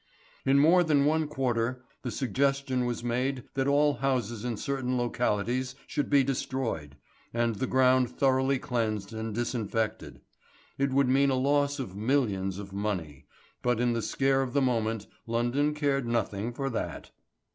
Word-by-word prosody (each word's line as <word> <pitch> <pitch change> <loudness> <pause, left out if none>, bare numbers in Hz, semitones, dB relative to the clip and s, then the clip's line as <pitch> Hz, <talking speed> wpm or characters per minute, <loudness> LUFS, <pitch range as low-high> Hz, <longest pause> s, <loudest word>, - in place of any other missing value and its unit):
In 135 +1 +5
more 165 +5 +6
than 145 -4 +3
one 155 +1 +2
quarter 125 -3 -1 0.2
the 125 - -4
suggestion 135 0 0
was 120 -1 -3
made 125 +2 -1
that 135 0 0
all 145 +1 +4
houses 120 -5 -1
in 120 -3 -2
certain 130 0 -2
localities 120 +1 -1
should 145 - -2
be 140 -2 +5
destroyed, 125 - -3 0.4
and 115 -1 +1
the 130 - -1
ground 130 -1 +4
thoroughly 130 +1 +2
cleansed 110 -5 -2
and 110 -1 -4
disinfected. 110 -2 -2 0.6
It 140 0 +2
would 135 0 +3
mean 135 +2 +4
a 135 - +2
loss 140 +2 +2
of 120 -9 -5
millions 100 -5 0
of 100 -1 -8
money, 90 -9 -3 0.3
but 125 -2 +1
in 120 0 +2
the 115 - -1
scare 135 +4 +1
of 130 -2 -3
the 140 - +3
moment 115 -4 0 0.2
London 120 +6 +1
cared 140 -4 0
nothing 115 -1 -1
for 135 +2 -3
that. 115 - -4
125 Hz, 155 wpm, -28 LUFS, 115-135 Hz, 0.6 s, more